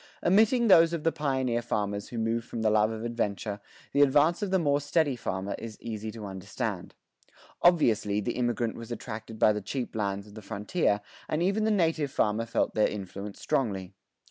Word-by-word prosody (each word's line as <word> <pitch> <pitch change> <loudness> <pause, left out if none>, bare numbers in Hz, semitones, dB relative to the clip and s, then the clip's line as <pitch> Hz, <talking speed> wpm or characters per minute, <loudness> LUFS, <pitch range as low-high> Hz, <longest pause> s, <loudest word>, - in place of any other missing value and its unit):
[21:1] - - 0
Omitting 225 +4 +4
those 165 -4 +7
of 165 -3 -3
the 165 - +3
pioneer 130 -6 0
farmers 105 -3 -2
who 120 - -6
move 115 +1 0
from 115 -1 -5
the 110 - +3
love 105 0 +4
of 110 0 -5
adventure, 105 -3 -2 0.3
the 140 - +4
advance 145 +6 +4
of 205 - -1
the 190 - +3
more 145 -4 +2
steady 145 -1 +1
farmer 95 -4 -3
is 110 -2 -8
easy 110 -1 -5
to 110 -1 -7
understand. 95 0 -5 0.7
Obviously 115 - +3
the 105 +3 -1
immigrant 120 -2 0
was 115 0 -9
attracted 110 -1 -6
by 105 - +5
the 105 - -3
cheap 120 +5 -4
lands 100 -2 -2
of 105 - -15
the 110 - -9
frontier, 105 - 0 0.3
and 155 +2 0
even 200 +4 +1
the - - +2
native 165 -7 +1
farmer 115 -2 0
felt 115 - 0
their 110 - +3
influence 100 0 -6
strongly. 100 -10 -1
115 Hz, 195 wpm, -28 LUFS, 105-145 Hz, 0.7 s, those